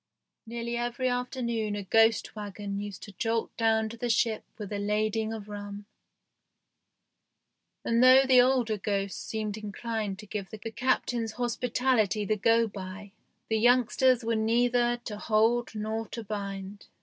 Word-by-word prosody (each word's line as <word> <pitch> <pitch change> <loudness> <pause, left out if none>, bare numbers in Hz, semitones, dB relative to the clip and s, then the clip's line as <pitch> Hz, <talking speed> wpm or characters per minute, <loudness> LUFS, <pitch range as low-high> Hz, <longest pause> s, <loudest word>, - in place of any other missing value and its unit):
Nearly 235 +1 -3
every 240 +2 -1
afternoon 235 -4 -2
a 205 - -4
ghost 225 +3 +3
wagon 205 -1 -5
used 205 -2 -7
to 205 - -9
jolt 225 +3 -2
down 220 -1 +2
to 230 - -9
the 240 +1 -3
ship 225 -1 +1
with 210 -2 -6
a 205 - -2
lading 215 +2 0
of 215 -2 -6
rum, 205 0 -7 2.0
and 230 +1 +2
though 260 +1 +8
the 255 -1 +7
older 245 -4 +2
ghosts 195 -1 -2
seemed 215 -1 -3
inclined 215 -1 -4
to 210 - -10
give 200 -1 -5
the 220 - -8
Captain's 230 0 -1
hospitality 240 -3 0
the 215 - +1
go 230 +3 +3
by, 200 0 -8 0.4
the 220 -1 +1
youngsters 245 +1 +4
were 230 0 0
neither 240 +2 +2
to 210 -1 -5
hold 225 +2 +2
nor 220 +1 -3
to 230 - -6
bind. 200 -1 -6
220 Hz, 150 wpm, -28 LUFS, 205-235 Hz, 2.0 s, though